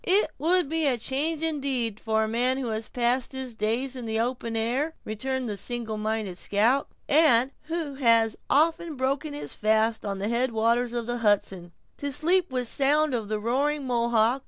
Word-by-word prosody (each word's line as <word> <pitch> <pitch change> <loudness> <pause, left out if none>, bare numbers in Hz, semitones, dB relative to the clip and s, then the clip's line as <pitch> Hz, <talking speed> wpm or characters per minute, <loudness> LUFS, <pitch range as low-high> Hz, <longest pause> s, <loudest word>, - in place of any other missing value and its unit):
"It 395 +4 +3
would 350 +1 +2
be 320 0 0
a 255 -3 +2
change, 290 +7 -1
indeed, 270 -8 -2
for 220 0 0
a - - -1
man 245 +4 +1
who 260 -3 -3
has 220 0 -3
passed 245 +2 0
his 260 -2 -5
days 230 +5 -1
in 245 -3 -6
the 220 0 -1
open 235 -1 -2
air," 260 +8 -1
returned 260 +4 -3
the 205 -2 -3
single 230 +1 -4
minded 215 -4 -2
scout; 230 +7 +2 0.2
"and 275 -4 +5
who 325 -3 -3
has 230 -4 +3
so - - -11
often 325 +1 +2
broken 275 +3 -2
his 290 - -5
fast 220 +1 +1
on 200 -1 -3
the 200 +2 -2
head 235 +2 0
waters 230 +2 +1
of 240 -1 -2
the 240 +1 -3
Hudson, 195 -5 0 0.3
to 285 0 -4
sleep 350 +6 +2
within 255 -1 -2
sound 290 +4 +2
of 225 -4 -2
the 215 -1 -1
roaring 275 +6 0
Mohawk. 235 0 +2
245 Hz, 190 wpm, -26 LUFS, 225-280 Hz, 0.3 s, and